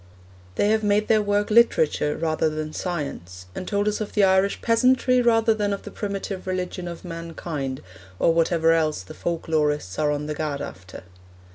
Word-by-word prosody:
They 205 - +2
have 220 0 +2
made 210 +1 +1
their 215 -1 +4
work 205 0 0
literature 160 -10 +3
rather 160 -1 0
than 155 0 -5
science, 115 - -5
and 185 - -6
told 205 0 0
us 210 +1 -1
of 215 - -5
the 210 - +3
Irish 190 +1 +3
peasantry 255 +2 +3
rather 225 -1 +3
than 205 -2 -1
of 200 - -5
the - - -8
primitive 200 -2 -5
religion 180 -1 -3
of 170 +1 -8
mankind, 165 -5 -5 0.3
or 165 - +3
whatever 165 0 +3
else 155 - 0
the 90 - -11
folk 170 -1 -4
lorists 150 - 0
are 150 -1 +2
on 145 0 -2
the 150 - -3
gad 150 -2 -3
after. 95 -6 -9
175 Hz, 180 wpm, -24 LUFS, 155-205 Hz, 0.3 s, their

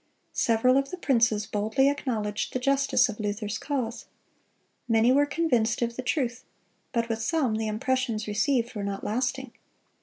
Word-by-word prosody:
Several 240 +3 +3
of 275 0 0
the 365 - -6
princes 230 - +2
boldly 220 +7 +1
acknowledged 225 -7 -2
the 255 - -1
justice 275 +2 +3
of 220 -2 -7
Luther's 210 +1 -3
cause. 250 -5 -3 0.8
Many 225 +1 +4
were 285 +2 +4
convinced 245 -8 +1
of 235 0 -2
the 255 - -3
truth; 250 -2 -1 0.5
but 235 -2 0
with 225 -1 -2
some 265 -2 +1
the 220 0 -2
impressions 230 0 -1
received 235 +3 0
were 205 -3 -4
not 200 0 -4
lasting. 255 +3 -2
235 Hz, 155 wpm, -27 LUFS, 220-265 Hz, 0.8 s, Many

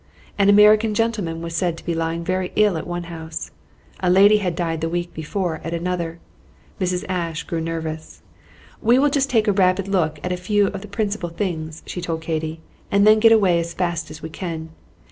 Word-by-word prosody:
An 200 -1 +3
American 210 +1 +6
gentleman 205 -8 -1
was 165 0 -5
said 170 0 0
to - - -13
be 170 - -1
lying 165 +1 -2
very 185 +1 -1
ill 210 -3 +4
at 160 - -4
one 175 0 -3
house. 160 -1 -7 0.5
A 180 - +1
lady 200 +3 +6
had 180 -5 -2
died 165 -2 -2
the 165 - -1
week 175 +1 -3
before 160 +1 -3
at 165 +1 -3
another. 170 -1 -3 0.6
Mrs. 180 -1 -1
Ashe 170 -3 -2
grew 165 -1 -3
nervous. 160 -1 -5 0.6
"We 235 +2 +4
will 285 +2 +3
just 275 -1 +1
take 225 -3 +2
a - - +5
rapid 185 0 +2
look 160 -6 0
at 180 - -2
a 180 - -1
few 205 +3 +2
of 195 - -6
the 210 - -9
principal 205 -3 -2
things," 160 -3 -4
she 180 - -5
told 165 -2 -3
Katy, 160 0 -3 0.3
"and 200 +1 +3
then 215 0 +7
get 225 +1 +6
away 195 -6 +4
as 170 0 -4
fast 170 -3 -2
as 155 - -10
we 160 - -5
can. 160 -2 -5
175 Hz, 205 wpm, -22 LUFS, 165-200 Hz, 0.6 s, then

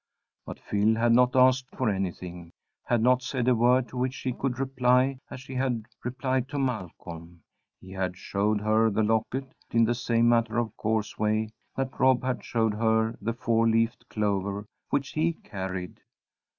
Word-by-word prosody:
But - - -7
Phil 105 +2 +1
had 115 +1 +2
not 125 +1 +4
asked 130 0 +4
for 130 - -1
anything; 90 -3 -4 0.3
had 120 -2 +1
not 125 +1 +4
said 125 -1 -2
a 130 - +6
word 125 +2 +3
to 125 - -8
which 130 +1 -1
she 130 -2 -3
could 130 0 -2
reply 130 0 +2
as 130 - -8
she 135 0 -10
had 125 -4 -1 0.2
replied 130 +1 -1
to 145 - -4
Malcolm. 85 - -5 0.4
He 95 - -13
had 95 -1 -3
showed 105 +2 0
her 110 +1 +3
the 110 +1 +1
locket 115 +5 -1 0.2
in 115 0 +4
the 120 - +1
same 120 -1 +1
matter 115 -1 +2
of 115 -2 -1
course 110 -1 -2
way 110 0 +1 0.3
that 135 0 -3
Rob 130 -1 +4
had 130 0 -2
showed 110 -2 0
her 110 +1 +1
the 115 - -1
four 115 -1 +1
leafed 115 0 0
clover 100 -1 -1 0.2
which 140 -1 0
he 165 +2 +1
carried. 95 - -6
115 Hz, 175 wpm, -27 LUFS, 105-130 Hz, 0.4 s, a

